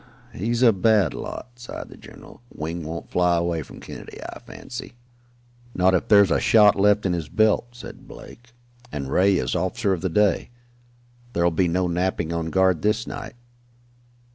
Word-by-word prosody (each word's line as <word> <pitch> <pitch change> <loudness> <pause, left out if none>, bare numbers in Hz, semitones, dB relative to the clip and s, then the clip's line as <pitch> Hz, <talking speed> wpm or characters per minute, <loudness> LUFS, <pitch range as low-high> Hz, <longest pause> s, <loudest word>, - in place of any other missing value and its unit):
"He's 115 +6 -1
a 115 -3 +6
bad 105 -1 +3
lot," 120 -1 -8
sighed 120 - -8
the - - -12
general. - - -15
"Wing 80 +2 -5
won't 80 +2 -7
fly 90 -1 +2
away 85 -1 -1
from - - -12
Kennedy, - - -10
I - - -8
fancy." 120 -1 -9 0.8
"Not 90 +1 +3
if 90 - +1
there's 100 -3 +6
a - - +3
shot 105 -2 +5
left 105 +1 +3
in 90 - +1
his 80 -3 -4
belt," 110 +4 +2
said 120 - -11
Blake. 120 +2 -13 0.4
"And 70 -2 -5
Ray 95 +1 +3
is 65 -8 -1
officer 100 - 0
of 90 - -3
the 95 - -1
day. 100 +2 +1 0.8
There'll 85 0 +2
be 90 +2 +1
no 90 +2 0
napping 85 -1 -1
on 85 -1 -2
guard 95 -2 +2
this 105 +3 0
night." 110 -1 -7
95 Hz, 170 wpm, -23 LUFS, 85-105 Hz, 0.8 s, a